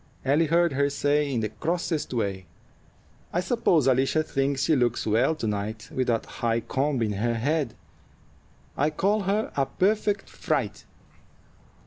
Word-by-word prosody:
Ellie 150 Hz, +4 st, +3 dB
heard 170 Hz, 0 st, +3 dB
her 140 Hz, +1 st, +2 dB
say, 145 Hz, 0 st, +1 dB
in 120 Hz, -4 st, 0 dB
the 110 Hz, -, -1 dB
crossest 165 Hz, -, -2 dB
way: 100 Hz, -6 st, -2 dB, 0.8 s
"I 175 Hz, -, 0 dB
suppose 180 Hz, -, +2 dB
Alicia 135 Hz, +4 st, +3 dB
thinks 135 Hz, -2 st, -1 dB
she 160 Hz, -, +3 dB
looks 120 Hz, -3 st, +1 dB
well 120 Hz, +9 st, +2 dB
to 155 Hz, -, -4 dB
night 105 Hz, +1 st, -3 dB
with 130 Hz, -1 st, 0 dB
that 115 Hz, -2 st, +1 dB
high 115 Hz, 0 st, -1 dB
comb 135 Hz, 0 st, 0 dB
in 105 Hz, -, 0 dB
her 115 Hz, +4 st, 0 dB
head. 140 Hz, +1 st, -1 dB, 1.0 s
I 145 Hz, +2 st, +2 dB
call 205 Hz, +6 st, +1 dB
her 205 Hz, +3 st, 0 dB
a 135 Hz, -1 st, +1 dB
perfect 205 Hz, +5 st, 0 dB
fright." 140 Hz, -, -2 dB
140 Hz, 150 wpm, -26 LUFS, 115-160 Hz, 1.0 s, Ellie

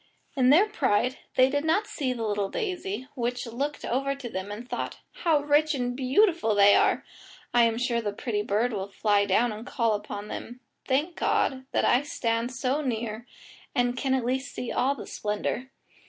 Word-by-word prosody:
In 255 Hz, -2 st, +4 dB
their 330 Hz, +9 st, +7 dB
pride 255 Hz, -, +1 dB, 0.2 s
they 255 Hz, 0 st, +6 dB
did 285 Hz, +2 st, -1 dB
not 330 Hz, +7 st, +2 dB
see 270 Hz, -9 st, -2 dB
the 240 Hz, -2 st, -3 dB
little 205 Hz, -2 st, -1 dB
daisy, 260 Hz, -, -3 dB
which 245 Hz, -1 st, -2 dB
looked 275 Hz, +6 st, -3 dB
over 275 Hz, +3 st, 0 dB
to 270 Hz, -3 st, -7 dB
them 190 Hz, +1 st, -4 dB
and 225 Hz, +4 st, -7 dB
thought, -, -, -4 dB
"How 310 Hz, -4 st, +1 dB
rich 295 Hz, +1 st, +3 dB
and 245 Hz, -2 st, -2 dB
beautiful 275 Hz, -, +2 dB
they 200 Hz, 0 st, +7 dB
are! -, -, +3 dB, 0.5 s
I 240 Hz, -1 st, +6 dB
am 230 Hz, -1 st, +1 dB
sure 240 Hz, -1 st, 0 dB
the 210 Hz, -2 st, -2 dB
pretty 210 Hz, 0 st, -2 dB
bird 215 Hz, +4 st, 0 dB
will 195 Hz, -2 st, -3 dB
fly 205 Hz, 0 st, +2 dB
down 225 Hz, +5 st, +3 dB
and 215 Hz, +1 st, -7 dB
call 230 Hz, -2 st, 0 dB
upon 205 Hz, 0 st, -5 dB
them. 240 Hz, +3 st, -7 dB, 0.3 s
Thank 295 Hz, +6 st, +1 dB
God, 260 Hz, 0 st, 0 dB
that -, -, +1 dB
I 250 Hz, -, +4 dB
stand 230 Hz, -4 st, -1 dB
so 260 Hz, +3 st, -1 dB
near 230 Hz, -3 st, -3 dB, 0.5 s
and 245 Hz, -1 st, +2 dB
can 265 Hz, +1 st, +1 dB
at 255 Hz, -3 st, -1 dB
least 265 Hz, +2 st, -2 dB
see 245 Hz, -, -4 dB
all 270 Hz, +3 st, +1 dB
the 255 Hz, -, -8 dB
splendour." 210 Hz, +4 st, -3 dB
245 Hz, 190 wpm, -27 LUFS, 220-275 Hz, 0.5 s, their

